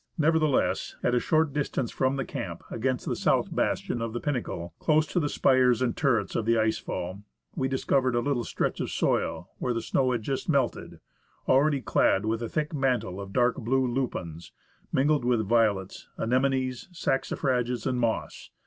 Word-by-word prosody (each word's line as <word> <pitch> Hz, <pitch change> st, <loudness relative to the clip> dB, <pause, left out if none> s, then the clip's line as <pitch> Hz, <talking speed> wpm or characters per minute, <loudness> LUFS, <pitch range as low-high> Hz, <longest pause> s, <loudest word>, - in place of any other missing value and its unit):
Nevertheless, 155 Hz, -3 st, +1 dB
at 125 Hz, -, +2 dB
a 125 Hz, -, +4 dB
short 155 Hz, +1 st, +1 dB
distance 140 Hz, -4 st, -1 dB
from 130 Hz, +1 st, 0 dB
the 135 Hz, -, -2 dB
camp, -, -, -6 dB
against 130 Hz, +2 st, -1 dB
the -, -, -1 dB
south -, -, +1 dB
bastion 120 Hz, -, -1 dB
of 115 Hz, -1 st, -3 dB
the 120 Hz, -, -2 dB
Pinnacle, 120 Hz, -, -3 dB
close 155 Hz, 0 st, +3 dB
to 175 Hz, -, -1 dB
the 145 Hz, -3 st, 0 dB
spires 130 Hz, -4 st, +3 dB
and 125 Hz, -3 st, 0 dB
turrets 115 Hz, -9 st, +1 dB
of 110 Hz, -, 0 dB
the 115 Hz, 0 st, +4 dB
ice 110 Hz, 0 st, +1 dB
fall, 95 Hz, +3 st, -5 dB, 0.3 s
we 130 Hz, -, 0 dB
discovered 130 Hz, -1 st, +1 dB
a -, -, +3 dB
little 125 Hz, -1 st, 0 dB
stretch -, -, -2 dB
of -, -, -2 dB
soil -, -, -1 dB
where 125 Hz, -2 st, -1 dB
the -, -, 0 dB
snow 130 Hz, -1 st, +1 dB
had 120 Hz, -3 st, -1 dB
just 135 Hz, +7 st, -3 dB
melted, 140 Hz, -6 st, 0 dB, 0.5 s
already 140 Hz, +1 st, +3 dB
clad 100 Hz, -4 st, +2 dB
with 110 Hz, +1 st, -1 dB
a 115 Hz, -, -3 dB
thick 150 Hz, +1 st, -2 dB
mantle 125 Hz, -9 st, 0 dB
of 100 Hz, 0 st, -8 dB
dark 125 Hz, +1 st, +2 dB
blue 130 Hz, +1 st, +1 dB
lupins, 105 Hz, -10 st, -3 dB, 0.4 s
mingled 145 Hz, +1 st, +2 dB
with 120 Hz, -3 st, +1 dB
violets, 105 Hz, -4 st, +1 dB
anemones, 130 Hz, +3 st, 0 dB
saxifrages, 130 Hz, -5 st, -1 dB
and 125 Hz, -1 st, 0 dB
moss. 115 Hz, -2 st, -2 dB
125 Hz, 175 wpm, -27 LUFS, 115-135 Hz, 0.5 s, a